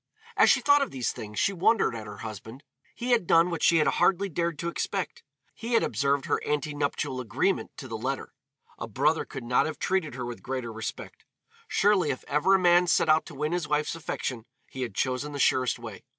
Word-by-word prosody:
As -, -, +5 dB
she -, -, +4 dB
thought 285 Hz, 0 st, +5 dB
of 275 Hz, -, 0 dB
these 130 Hz, -3 st, -2 dB
things 105 Hz, -1 st, -9 dB
she 200 Hz, -, +2 dB
wondered 195 Hz, -, +2 dB
at 110 Hz, -2 st, -7 dB
her 105 Hz, 0 st, -9 dB
husband. 110 Hz, +5 st, -8 dB, 0.3 s
He 245 Hz, +1 st, -3 dB
had 230 Hz, -8 st, +3 dB
done 165 Hz, +2 st, +4 dB
what 170 Hz, -, -3 dB
she 170 Hz, -, +5 dB
had 155 Hz, -, +3 dB
hardly 195 Hz, +1 st, +2 dB
dared 170 Hz, -1 st, -2 dB
to 170 Hz, -, -4 dB
expect 190 Hz, +2 st, -3 dB, 0.3 s
he 230 Hz, +1 st, -5 dB
had 230 Hz, -, +4 dB
observed 140 Hz, +4 st, 0 dB
their -, -, +1 dB
ante 150 Hz, +1 st, -1 dB
nuptial 140 Hz, -3 st, -2 dB
agreement 130 Hz, -, -1 dB
to 130 Hz, -, -8 dB
the 115 Hz, -2 st, -5 dB
letter. 135 Hz, +4 st, -4 dB, 0.5 s
A -, -, -4 dB
brother 150 Hz, +9 st, +1 dB
could 135 Hz, -4 st, -8 dB
not 125 Hz, +5 st, +2 dB
have 155 Hz, -, -5 dB
treated 185 Hz, -9 st, -1 dB
her 125 Hz, -1 st, -4 dB
with 120 Hz, -1 st, -7 dB
greater 125 Hz, -3 st, -4 dB
respect. 110 Hz, 0 st, -7 dB, 0.4 s
Surely 195 Hz, -6 st, +2 dB
if 130 Hz, -, -3 dB
ever 150 Hz, +7 st, +3 dB
a -, -, +3 dB
man 175 Hz, 0 st, +4 dB
set 165 Hz, -, +3 dB
out 155 Hz, +1 st, +4 dB
to 160 Hz, -, -10 dB
win 150 Hz, +3 st, -2 dB
his 175 Hz, -3 st, -1 dB
wife's 150 Hz, 0 st, 0 dB
affection 125 Hz, -7 st, -5 dB, 0.2 s
he 130 Hz, -, -6 dB
had 120 Hz, -6 st, -4 dB
chosen 130 Hz, +3 st, -1 dB
the 140 Hz, -, -5 dB
surest 130 Hz, -2 st, +2 dB
way. 115 Hz, -4 st, -9 dB
150 Hz, 220 wpm, -27 LUFS, 125-175 Hz, 0.5 s, As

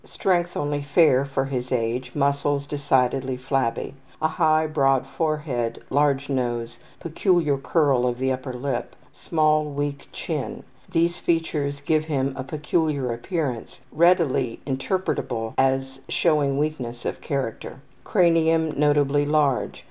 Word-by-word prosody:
Strength 175 Hz, -2 st, 0 dB
only 145 Hz, 0 st, -1 dB
fair; 140 Hz, -2 st, +4 dB
for 135 Hz, -1 st, -1 dB
his 130 Hz, -2 st, -4 dB
age, 125 Hz, +1 st, -2 dB
muscles 140 Hz, 0 st, +1 dB
decidedly 135 Hz, -2 st, 0 dB
flabby. 130 Hz, -2 st, -1 dB, 0.3 s
A 160 Hz, -, +1 dB
high, 155 Hz, -1 st, +2 dB
broad 135 Hz, -4 st, +2 dB
forehead. 150 Hz, -8 st, -2 dB
Large 140 Hz, 0 st, +2 dB
nose. 120 Hz, -4 st, -2 dB, 0.2 s
Peculiar 170 Hz, -2 st, +1 dB
curl 135 Hz, -3 st, +2 dB
of 120 Hz, -1 st, -1 dB
the 130 Hz, +1 st, 0 dB
upper 130 Hz, 0 st, -3 dB
lip. 125 Hz, 0 st, -4 dB, 0.2 s
Small, 155 Hz, -1 st, +1 dB
weak 145 Hz, -1 st, -4 dB
chin. -, -, -4 dB, 0.3 s
These 170 Hz, +1 st, +1 dB
features 150 Hz, -4 st, -1 dB
give 155 Hz, +1 st, +1 dB
him 135 Hz, -3 st, -1 dB
a 130 Hz, -, -4 dB
peculiar 150 Hz, -2 st, -1 dB
appearance 125 Hz, -2 st, -4 dB
readily 160 Hz, -8 st, +2 dB
interpretable 130 Hz, -5 st, -2 dB
as 135 Hz, 0 st, +1 dB
showing 150 Hz, -5 st, +2 dB
weakness 130 Hz, -6 st, -3 dB
of -, -, -3 dB
character. 135 Hz, -2 st, -4 dB, 0.2 s
Cranium 165 Hz, -3 st, +3 dB
notably 145 Hz, 0 st, +2 dB
large. 145 Hz, -4 st, +1 dB
140 Hz, 125 wpm, -24 LUFS, 130-155 Hz, 0.3 s, fair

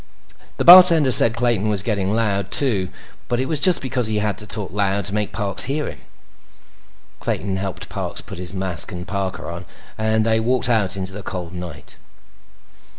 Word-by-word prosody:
The -, -, -2 dB
bartender 170 Hz, -6 st, +8 dB
said 115 Hz, -1 st, +6 dB
Clayton 120 Hz, -4 st, -1 dB
was 100 Hz, -2 st, -1 dB
getting 100 Hz, -3 st, -2 dB
loud, 100 Hz, -4 st, -2 dB
too, 100 Hz, -8 st, +2 dB, 0.4 s
but 120 Hz, 0 st, -2 dB
it 130 Hz, -, -1 dB
was 150 Hz, +2 st, 0 dB
just 185 Hz, -6 st, +4 dB
because 125 Hz, -3 st, +1 dB
he 110 Hz, -1 st, -2 dB
had 105 Hz, -1 st, -2 dB
to 105 Hz, -, -10 dB
talk 105 Hz, -4 st, -1 dB
loud 100 Hz, 0 st, -2 dB
to 100 Hz, -, -2 dB
make 105 Hz, -1 st, -3 dB
Parks 100 Hz, -3 st, +3 dB
hear 145 Hz, +3 st, -3 dB
him. -, -, -9 dB, 1.2 s
Clayton 95 Hz, -1 st, -3 dB
helped 95 Hz, -1 st, -6 dB
Parks -, -, -4 dB
put -, -, -9 dB
his 90 Hz, -1 st, -4 dB
mask 95 Hz, -3 st, -2 dB
and 90 Hz, 0 st, -8 dB
parka 100 Hz, -2 st, -5 dB
on 85 Hz, +1 st, -7 dB, 0.4 s
and 110 Hz, 0 st, 0 dB
they 110 Hz, 0 st, +1 dB
walked 125 Hz, +2 st, 0 dB
out 105 Hz, -5 st, 0 dB
into 95 Hz, 0 st, -6 dB
the 105 Hz, -, -8 dB
cold 90 Hz, -3 st, -7 dB
night. 90 Hz, -5 st, -9 dB
105 Hz, 185 wpm, -19 LUFS, 95-120 Hz, 1.2 s, bartender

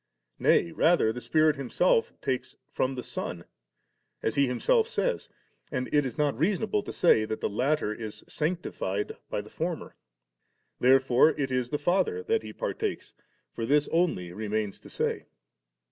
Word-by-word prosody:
Nay, 85 Hz, -, +3 dB
rather 160 Hz, -, +3 dB
the 125 Hz, -, -6 dB
Spirit 155 Hz, +1 st, +3 dB
Himself 135 Hz, 0 st, +2 dB
takes 130 Hz, -1 st, -2 dB, 0.2 s
from 130 Hz, +1 st, 0 dB
the 125 Hz, -, -5 dB
Son, 90 Hz, -8 st, -5 dB, 0.8 s
as 110 Hz, -, +1 dB
He 140 Hz, -1 st, +3 dB
Himself 445 Hz, -, +2 dB
says; -, -, -1 dB, 0.4 s
and 125 Hz, -, -2 dB
it 145 Hz, -1 st, +4 dB
is 125 Hz, -, -5 dB
not 145 Hz, -2 st, +1 dB
reasonable 205 Hz, +6 st, +1 dB
to -, -, -7 dB
say 110 Hz, -10 st, +4 dB
that 110 Hz, 0 st, -3 dB
the -, -, 0 dB
latter 125 Hz, +2 st, 0 dB
b 110 Hz, -1 st, -5 dB
sanctified 130 Hz, -, -3 dB
by -, -, -2 dB
the -, -, -14 dB
former. -, -, -4 dB, 0.9 s
Therefore 130 Hz, +3 st, +4 dB
it 135 Hz, -2 st, -1 dB
is 125 Hz, -1 st, 0 dB
the 150 Hz, -, -1 dB
Father 195 Hz, -, +1 dB
that 455 Hz, 0 st, +1 dB
He -, -, -8 dB
partakes; 445 Hz, -4 st, -3 dB, 0.4 s
for 115 Hz, -, -4 dB
this 145 Hz, +5 st, +3 dB
only 160 Hz, -, 0 dB
remains 105 Hz, 0 st, -2 dB
to -, -, -14 dB
say. -, -, -2 dB
135 Hz, 160 wpm, -28 LUFS, 115-170 Hz, 0.9 s, it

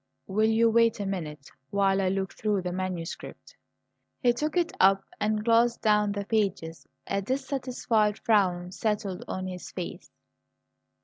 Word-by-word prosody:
"Will 215 Hz, +3 st, +2 dB
you 225 Hz, +1 st, +4 dB
wait 230 Hz, 0 st, +3 dB
a 200 Hz, -, -2 dB
minute 155 Hz, -7 st, -5 dB, 0.2 s
while 195 Hz, -1 st, +2 dB
I 185 Hz, -, +1 dB
look 190 Hz, 0 st, -2 dB
through 210 Hz, -3 st, -1 dB
the 180 Hz, -, -2 dB
manuscript?" 180 Hz, -2 st, -5 dB, 0.6 s
He 245 Hz, -2 st, +3 dB
took 305 Hz, +7 st, -2 dB
it 345 Hz, -1 st, +2 dB
up 195 Hz, +1 st, +5 dB, 0.2 s
and 215 Hz, 0 st, 0 dB
glanced 235 Hz, +1 st, +3 dB
down 210 Hz, -1 st, +3 dB
the 200 Hz, -1 st, -4 dB
pages. 195 Hz, -7 st, -1 dB, 0.2 s
A 200 Hz, 0 st, -1 dB
dissatisfied 250 Hz, -3 st, 0 dB
frown 180 Hz, -5 st, +1 dB
settled 205 Hz, -2 st, -2 dB
on 185 Hz, 0 st, -4 dB
his 180 Hz, -1 st, -6 dB
face. 180 Hz, -2 st, -7 dB
205 Hz, 145 wpm, -27 LUFS, 185-225 Hz, 0.6 s, up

